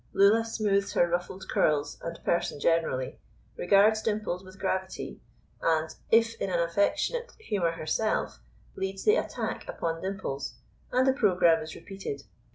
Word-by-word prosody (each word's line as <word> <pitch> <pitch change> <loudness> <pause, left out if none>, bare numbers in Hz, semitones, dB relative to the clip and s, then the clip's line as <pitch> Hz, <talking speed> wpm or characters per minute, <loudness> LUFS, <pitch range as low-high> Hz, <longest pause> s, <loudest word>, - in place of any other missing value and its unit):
Lulla 205 +3 +5
smooths 205 -3 0
her 175 - +4
ruffled 180 +2 -3
curls 150 -1 +1
and 170 0 -5
person 170 -4 0
generally, 160 -5 0 0.4
regards 205 +4 +4
Dimples 210 -4 -2
with 185 0 -13
gravity, 190 -1 -3 0.4
and, 160 -1 +1 0.2
if 230 0 +5
in - - 0
an 175 -2 +1
affectionate 200 - 0
humour 190 - 0
herself, 165 +7 -1 0.4
leads 190 0 -3
the 430 - +5
attack - - -3
upon 165 -1 -3
Dimples, 190 -8 -4 0.4
and 255 +1 +3
the 265 - +5
programme 180 - +4
is 155 0 -7
repeated. 195 -8 -6
190 Hz, 140 wpm, -28 LUFS, 165-210 Hz, 0.4 s, Lulla